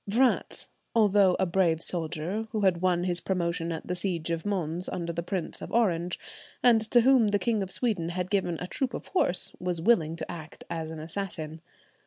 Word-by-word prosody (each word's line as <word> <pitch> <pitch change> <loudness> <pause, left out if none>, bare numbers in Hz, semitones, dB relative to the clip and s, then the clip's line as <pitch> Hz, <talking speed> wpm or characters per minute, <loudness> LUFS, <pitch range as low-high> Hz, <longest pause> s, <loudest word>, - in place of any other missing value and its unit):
Vratz, 245 +5 +1 0.3
although 205 -4 +5
a 190 - +3
brave 170 -3 +2
soldier, 175 +5 -2
who 215 - 0
had 185 -3 +2
won 180 -1 +2
his 180 -1 +4
promotion 170 -2 -1
at 160 - -5
the 180 - -2
siege 175 -3 -2
of 165 +4 -2
Mons, 180 -3 -2
under 170 -1 -3
the 170 - -2
Prince 180 0 -3
of - - -7
Orange, 180 -7 +1 0.5
and 235 -3 +6
to 240 - +6
whom 255 -2 +5
the 205 0 +2
King 215 +2 0
of 190 - -3
Sweden 190 -6 -1
had 180 +1 -3
given 185 -4 +1
a 180 - -4
troop 255 +7 -2
of - - -7
horse, 190 - +1
was 180 -2 -2
willing 165 -4 +3
to - - -6
act 160 -2 -9
as 160 -1 -3
an 160 -1 -7
assassin. 160 -2 -5
180 Hz, 200 wpm, -28 LUFS, 165-205 Hz, 0.5 s, and